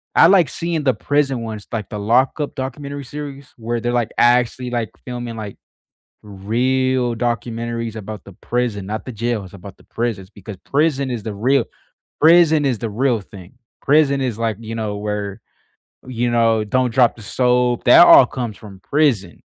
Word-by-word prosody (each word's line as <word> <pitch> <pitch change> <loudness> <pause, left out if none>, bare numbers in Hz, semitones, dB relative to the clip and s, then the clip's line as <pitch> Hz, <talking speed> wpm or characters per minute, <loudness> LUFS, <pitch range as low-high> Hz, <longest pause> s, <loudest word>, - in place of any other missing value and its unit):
I - - +7
like 180 -4 +4
seeing 170 -2 -3
the 130 -4 +2
prison 135 0 0
ones, 110 -3 -7
like 110 -4 -4
the 105 - -5
Lockup 130 +7 +1
documentary 140 +2 -5
series, 140 0 -8
where 120 0 -3
they're, 120 +1 -2
like, 120 -2 0
actually, 125 +1 +2
like, 120 -3 -2 0.2
filming, 120 -2 -6
like, 105 -3 -7 0.7
real 125 +5 0
documentaries 115 -1 -3
about 110 -1 -8
the 100 - -12
prison 115 -1 -3
not 110 +2 -5
the 130 - -7
jails, 115 -1 -2
it's 90 - -15
about 100 0 -11
the - - -22
prisons 110 -5 -4
because 100 0 -10
prison 140 -2 0
is 120 -3 -4
the 105 0 -5
real 125 +5 +1 0.6
prison 160 -1 +5
is 130 -4 0
the 115 - -3
real 120 +1 0
thing. 95 -2 -14 0.3
Prison 140 -1 +3
is, 125 -5 -2
like, 115 -3 -2
you 115 0 -7
know, 105 -2 -3
where, 105 0 -4 0.7
you 120 -1 -1
know, 115 -2 +2
"don't 125 +3 0
drop 125 -1 +3
the 115 - -13
soap", 125 +2 +1
that 130 +7 +8
all - - +9
comes 120 -5 -5
from 100 -3 -13
prison. 125 - 0
120 Hz, 175 wpm, -19 LUFS, 110-130 Hz, 0.7 s, all